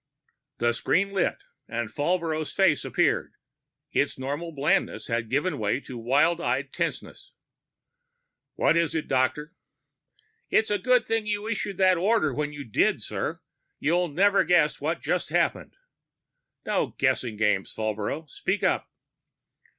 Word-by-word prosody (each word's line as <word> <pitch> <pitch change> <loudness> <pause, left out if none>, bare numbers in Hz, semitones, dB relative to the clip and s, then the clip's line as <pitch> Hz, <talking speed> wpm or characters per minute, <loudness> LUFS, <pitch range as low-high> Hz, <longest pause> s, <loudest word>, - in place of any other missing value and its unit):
The 120 0 +2
screen 195 +11 +1
lit 195 -2 0 0.3
and 120 -1 -3
Falbrough's 160 0 -1
face 190 -8 +3
appeared; - - 0 0.6
its - - 0
normal 145 +6 -4
blandness 145 -1 0
had 115 -2 -2
given 145 +7 0
way 105 +3 0
to 130 - -9
wild 140 +8 +2
eyed - - -1
tenseness. - - -4 1.2
"What - - +3
is 170 -2 +1
it, 160 - -2
Doctor?" 135 +4 0 1.0
"It's 220 -1 +2
a 205 - +1
good 250 +2 +3
thing 225 -1 -1
you 210 0 -2
issued 205 -4 -3
that 185 -2 +4
order 195 - +2
when 150 +2 -2
you 145 -1 -7
did, 110 - +1
sir! - - -4 0.4
You'll 175 +4 +1
never 195 +6 +3
guess 170 -5 +3
what 160 +4 -1
just - - -1
happened - - 0 0.5
" - - -55
"No - - -1
guessing 115 -4 0
games, 105 -3 +1
Falbrough. 110 +8 -3
Speak 190 +8 -2
up." - - +1
155 Hz, 140 wpm, -26 LUFS, 130-185 Hz, 1.2 s, that